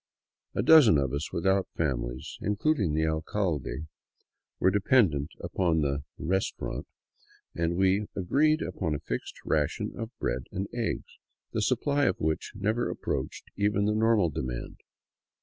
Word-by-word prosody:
A -, -, +1 dB
dozen 150 Hz, -, +8 dB
of 70 Hz, -2 st, 0 dB
us 70 Hz, +2 st, -3 dB
without 95 Hz, +3 st, +1 dB
families, 65 Hz, -5 st, -2 dB
including 105 Hz, -, +1 dB
the 80 Hz, 0 st, +2 dB
alcalde, 80 Hz, -1 st, -1 dB, 0.7 s
were 95 Hz, -, +4 dB
dependent 95 Hz, -, +3 dB
upon 85 Hz, -2 st, +1 dB
the 70 Hz, -1 st, -1 dB
" -, -, -52 dB
restaurant," 95 Hz, +3 st, -2 dB, 0.7 s
and 85 Hz, 0 st, 0 dB
we 95 Hz, +3 st, +2 dB
agreed 150 Hz, -, +2 dB
upon 80 Hz, -2 st, -2 dB
a -, -, -3 dB
fixed -, -, -4 dB
ration -, -, 0 dB
of 115 Hz, -1 st, -5 dB
bread -, -, -2 dB
and 95 Hz, +2 st, -3 dB
eggs, 120 Hz, -2 st, -3 dB, 0.3 s
the -, -, 0 dB
supply 145 Hz, 0 st, +2 dB
of -, -, +1 dB
which 80 Hz, 0 st, -1 dB
never 110 Hz, +4 st, 0 dB
approached 65 Hz, -, -4 dB
even 100 Hz, 0 st, +1 dB
the 105 Hz, -, +2 dB
normal 110 Hz, -5 st, +3 dB
demand. 65 Hz, -3 st, -5 dB
95 Hz, 140 wpm, -28 LUFS, 75-105 Hz, 0.7 s, dozen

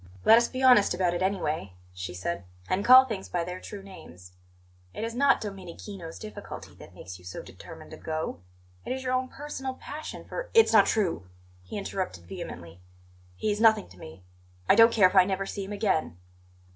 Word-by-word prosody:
"Let 225 Hz, +1 st, +8 dB
us 235 Hz, -, +1 dB
be 260 Hz, 0 st, -5 dB
honest 245 Hz, -8 st, +6 dB
about 180 Hz, -1 st, +1 dB
it, 175 Hz, -, -3 dB
anyway," 160 Hz, -, -1 dB, 0.2 s
she 90 Hz, 0 st, -6 dB
said; 100 Hz, -, -4 dB, 0.2 s
"and 190 Hz, +2 st, 0 dB
call 255 Hz, +3 st, +9 dB
things 215 Hz, -6 st, -6 dB
by 175 Hz, -1 st, -1 dB
their 180 Hz, +1 st, -6 dB
true 200 Hz, -2 st, -9 dB
names. 90 Hz, -, -13 dB, 0.6 s
It -, -, -4 dB
is 230 Hz, 0 st, -3 dB
not 275 Hz, +3 st, +4 dB
Domenichino's 190 Hz, -3 st, -8 dB
difficulty 210 Hz, -1 st, -9 dB
that -, -, -15 dB
makes 90 Hz, +1 st, -10 dB
you -, -, -18 dB
so 90 Hz, -, -7 dB
determined -, -, -12 dB
to -, -, -9 dB
go. 155 Hz, -, -4 dB, 0.4 s
It -, -, -3 dB
is 265 Hz, 0 st, -5 dB
your 255 Hz, 0 st, -1 dB
own 255 Hz, 0 st, 0 dB
personal 270 Hz, -2 st, -6 dB
passion 305 Hz, +4 st, -8 dB
for -, -, -6 dB
" -, -, -29 dB
"It's 450 Hz, -, +6 dB
not -, -, +7 dB
true!" 175 Hz, -, -1 dB, 0.3 s
he 90 Hz, -, -8 dB
interrupted 185 Hz, -, -4 dB
vehemently. 85 Hz, 0 st, -8 dB, 0.6 s
"He 215 Hz, -, -1 dB
is 205 Hz, +1 st, -2 dB
nothing 220 Hz, -2 st, +5 dB
to 90 Hz, -, -17 dB
me; 80 Hz, +3 st, -12 dB, 0.4 s
I -, -, +7 dB
don't 230 Hz, +2 st, +7 dB
care 205 Hz, -5 st, +6 dB
if 185 Hz, -, -6 dB
I 185 Hz, -, +8 dB
never 195 Hz, +1 st, -2 dB
see 200 Hz, 0 st, -5 dB
him 195 Hz, -, -9 dB
again." 195 Hz, -, -1 dB
195 Hz, 200 wpm, -27 LUFS, 160-230 Hz, 0.6 s, call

